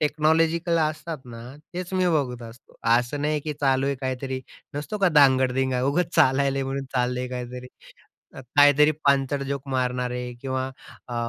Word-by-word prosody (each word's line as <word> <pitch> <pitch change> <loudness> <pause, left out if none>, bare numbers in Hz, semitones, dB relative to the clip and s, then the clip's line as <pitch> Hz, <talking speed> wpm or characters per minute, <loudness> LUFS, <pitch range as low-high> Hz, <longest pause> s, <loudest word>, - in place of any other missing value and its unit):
Technological 160 +3 +2
असतात 155 +1 -6
ना, 115 -2 -10 0.3
तेच 180 +1 -5
मी 185 -1 +2
बघत 135 -7 -1
असतो. 115 +1 -20 0.2
असं 125 +4 -3
नाही 150 0 0
की 150 +1 -4
चालू 135 -1 +2
आहे 140 - 0
काहीतरी 130 0 -3 0.3
नसतो 150 +9 -4
का 195 - +4
धांगड 130 -2 +5
धिंगा, 130 -1 0
उगाच 160 +5 0
चालायला 135 +1 +3
म्हणून 135 +1 -3
चाललंय 125 0 0
काहीतरी, 125 0 -6 0.9
काहीतरी 145 +1 +6
पांचट 140 0 +2
जोक 140 0 -4
मारणार 125 -1 -1
आहे 125 0 -4
किंवा 130 0 -2 0.4
अ, 120 - -5
135 Hz, 155 wpm, -24 LUFS, 125-150 Hz, 0.9 s, काहीतरी